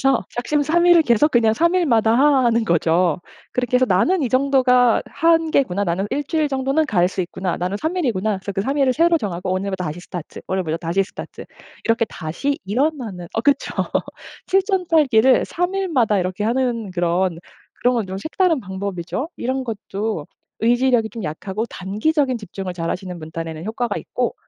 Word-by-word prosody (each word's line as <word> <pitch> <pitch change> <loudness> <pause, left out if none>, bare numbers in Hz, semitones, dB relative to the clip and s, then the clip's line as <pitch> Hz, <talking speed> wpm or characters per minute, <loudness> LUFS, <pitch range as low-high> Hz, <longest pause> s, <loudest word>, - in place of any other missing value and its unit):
그래서 270 -2 +2
작심삼일을 320 +7 +3
계속 270 +3 +3
그냥 230 -4 +3
3 340 +9 +2
일마다 235 -11 +3
하 275 0 +4
하는 230 -1 +2
거죠. 170 -2 +2 0.3
그렇게 250 0 -1
해서 255 - +4
'나는 295 - +2
이 260 - 0
정도가 255 -3 +3
하 330 - +1
한계구나. 280 - +1
나는 185 +2 -1
일주일 295 +2 0
정도는 270 +3 0
갈 180 -9 +2
수 190 - -4
있구나. 180 0 -3
나는 180 +3 -2
3 320 +3 -1
일이구나.' 215 - 0
그래서 190 +1 -6
그 195 - -2
3 275 +6 -2
일을 270 -2 +3
새로 335 +3 +4
정하고 185 - -3
오늘부터 190 -1 -2
다시 155 +2 -5
스타트. 175 -2 -8
오늘부터 180 -4 -1
다시 170 +4 0
스타트. - - -9 0.4
이렇게 230 0 +2
다시 195 - -3
일어나는 225 - -2
어 225 - +1
그쵸. 285 0 +1 0.7
칠전팔기를 330 - +3
3 355 +2 -2
일마다 270 - +1
이렇게 185 +2 -2
하는 235 -3 0
그런 175 0 0 0.4
그런 250 +1 +3
건 225 -4 -1
좀 190 0 -5
색다른 325 - +1
방법이죠. 190 - -4
이런 260 +2 -2
것도 210 -6 -4 0.3
의지력이 240 -1 +2
좀 230 - -7
약하고 190 +7 -4
단기적인 250 - -1
집중을 195 -3 -6
잘하시는 180 +1 -4
분 155 -1 -9
딴에는 165 0 -6
효과가 225 0 -2
있고 245 -1 -2
230 Hz, 380 characters per minute, -21 LUFS, 185-275 Hz, 0.7 s, 하